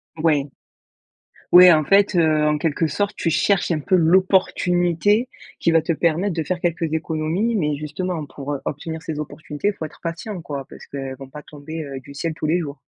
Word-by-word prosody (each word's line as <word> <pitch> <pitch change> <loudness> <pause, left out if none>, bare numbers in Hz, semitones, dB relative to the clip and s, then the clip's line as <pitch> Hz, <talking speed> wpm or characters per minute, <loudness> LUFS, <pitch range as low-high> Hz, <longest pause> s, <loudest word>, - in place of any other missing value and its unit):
Ouais. 155 -3 +1 1.1
Ouais, 180 0 +10
en 155 -2 +3
fait, 195 +2 +4
heu, 155 -2 +3
en 150 0 +2
quelque 160 +1 0
sorte, 205 +7 -2
tu 165 - -1
cherches 180 +2 +1
un 155 - +1
peu 185 +6 +1
l'opportunité, 185 +4 +2 0.3
qui 170 - +3
va 165 -1 +4
te 165 +1 -1
permettre 170 +4 0
de 160 - -1
faire 175 +4 -2
quelques 170 -2 -1
économies. 160 +8 -1
Mais 150 -6 0
justement, 160 +1 -4
pour, 140 +1 -6
heu, - - -5
obtenir 160 +3 -5
ces 155 -2 -5
opportunités, 150 +5 -3
faut 160 - -6
être 155 - -12
patient, 170 +3 -5
quoi, 140 -4 -6
parce - - -12
qu'elles 135 -1 -6
vont 135 0 -11
pas 150 +1 -10
tomber, 155 +1 -8
heu, 135 -1 -6
du 140 +2 -13
ciel 160 +3 -3
tous 155 - -4
les 170 +3 +2
jours. 145 -3 -6
160 Hz, 200 wpm, -21 LUFS, 150-180 Hz, 1.1 s, Ouais